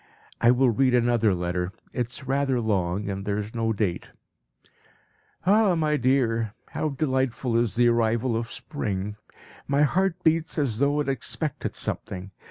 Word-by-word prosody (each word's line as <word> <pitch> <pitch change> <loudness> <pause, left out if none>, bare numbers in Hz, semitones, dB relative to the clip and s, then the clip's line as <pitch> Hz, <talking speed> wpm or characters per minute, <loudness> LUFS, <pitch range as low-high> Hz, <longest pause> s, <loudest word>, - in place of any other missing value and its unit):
I 120 - +5
will 125 0 +4
read 125 +3 +3
another 115 -4 +3
letter; 90 +1 -2 0.2
it 125 -2 -1
is 125 +2 -8
rather 135 -1 +1
long 100 -3 0
and 100 -1 -3
there 100 0 -1
is 105 +1 -5
no 115 -1 0
date. 100 -5 -2 1.3
"Ah, 200 -1 +4
my 155 -2 +1
dear, 115 -5 +1
how 155 - -2
delightful 130 -4 -1
is 115 -4 +2
the 120 0 +4
arrival 115 +1 +1
of 115 +1 -2
spring! 105 -7 -4 0.5
My 140 +1 +3
heart 185 +4 +2
beats 160 +1 +1
as 130 -8 0
though 145 +1 +2
it 145 - -3
expected 135 +3 -2
something. 95 +1 -5
120 Hz, 155 wpm, -25 LUFS, 105-140 Hz, 1.3 s, I